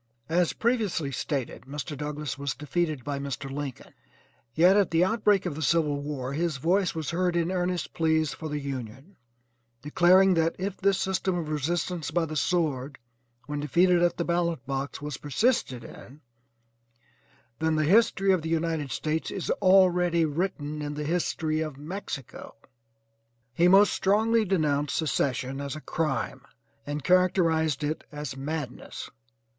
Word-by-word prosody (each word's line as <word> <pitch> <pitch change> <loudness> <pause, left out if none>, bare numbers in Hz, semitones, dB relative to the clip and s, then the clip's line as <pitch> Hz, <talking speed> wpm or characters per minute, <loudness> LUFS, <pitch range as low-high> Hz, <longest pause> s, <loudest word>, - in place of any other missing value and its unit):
As 175 +1 +2
previously 215 - 0
stated, 135 -3 -3
Mr. 145 +2 -5
Douglass 150 -2 -4
was 140 -2 -3
defeated 150 0 -2
by 140 +1 -3
Mr. 140 0 -5
Lincoln, 140 -2 -6 0.6
yet 180 +4 +6
at 205 -3 +3
the 165 +1 +3
outbreak 210 -2 +2
of 175 - -2
the 155 - -6
civil 150 -2 +1
war 140 -3 -4
his 160 0 -1
voice 180 +6 +1
was 160 -2 -3
heard 180 0 0
in 170 +1 +1
earnest 180 -1 -2
pleas 160 -2 +1
for 160 - -6
the 150 - -2
Union, 135 - -7 0.7
declaring 185 +5 +5
that 165 -1 +1
if 195 +1 -3
this 195 -1 +2
system 190 -1 -1
of 160 -3 -4
resistance 160 +1 -2
by 170 +1 +1
the 155 -1 -6
sword, 145 -4 0 0.5
when 145 0 -4
defeated 175 +5 +3
at 175 0 +2
the 170 - -1
ballot 170 -5 0
box 135 +1 -4
was 150 -1 -4
persisted 145 - 0
in, 140 +5 -12 1.4
then 160 0 +1
"The 155 - +2
history 195 +1 +4
of 185 -3 +2
the 160 - -4
United 165 -3 -1
States 155 +1 -2
is 190 - -3
already 180 -3 +4
written 150 -2 -3
in 145 0 -4
the 150 - -3
history 160 -1 -1
of 155 -4 -4
Mexico." 150 - -7 1.0
He 170 +7 +4
most 195 +2 +6
strongly 220 +3 +2
denounced 150 -6 0
secession 135 -3 -1
as 140 +1 -4
a - - -6
crime 150 -4 -2 0.5
and 145 0 -3
characterized 165 -4 +2
it 150 +2 -2
as 150 -2 -5
madness. 145 0 -6
160 Hz, 150 wpm, -27 LUFS, 145-180 Hz, 1.4 s, yet